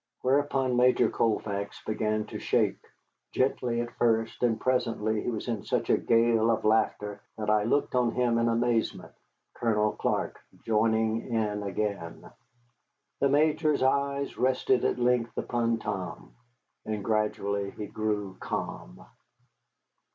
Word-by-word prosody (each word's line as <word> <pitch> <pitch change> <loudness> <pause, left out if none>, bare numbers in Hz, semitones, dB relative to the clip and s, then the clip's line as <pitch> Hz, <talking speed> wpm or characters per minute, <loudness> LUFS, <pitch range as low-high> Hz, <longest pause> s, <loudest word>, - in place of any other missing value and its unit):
Whereupon 135 -1 +1
Major 125 +1 +4
Colfax 100 -3 -1
began 110 0 -1
to - - -7
shake, - - 0 0.5
gently 125 -2 0
at 120 0 -6
first, 115 -1 +1
and 120 -3 +2
presently 115 -4 0
he - - -2
was 110 -1 -4
in 115 -4 -2
such - - 0
a - - +5
gale 115 -1 +3
of 115 - 0
laughter 105 -2 +1 0.2
that 105 -1 0
I 105 -1 +3
looked 140 +5 +1
on 125 -2 +3
him 120 -1 +1
in 115 - +2
amazement, 115 0 0 0.4
Colonel 105 -2 +1
Clark - - -2 0.3
joining 110 0 +1
in 105 -2 0
again. 100 -3 -4 0.9
The 140 - +3
Major's 150 0 +2
eye 140 +1 +1
rested 130 -1 +2
at - - +1
length 120 -1 +1
upon 115 -1 0
Tom, 85 - -5 0.5
and 105 -2 -4
gradually 100 -2 0
he 105 - -7
grew 105 -2 -3
calm. - - -5
115 Hz, 130 wpm, -28 LUFS, 105-125 Hz, 0.9 s, a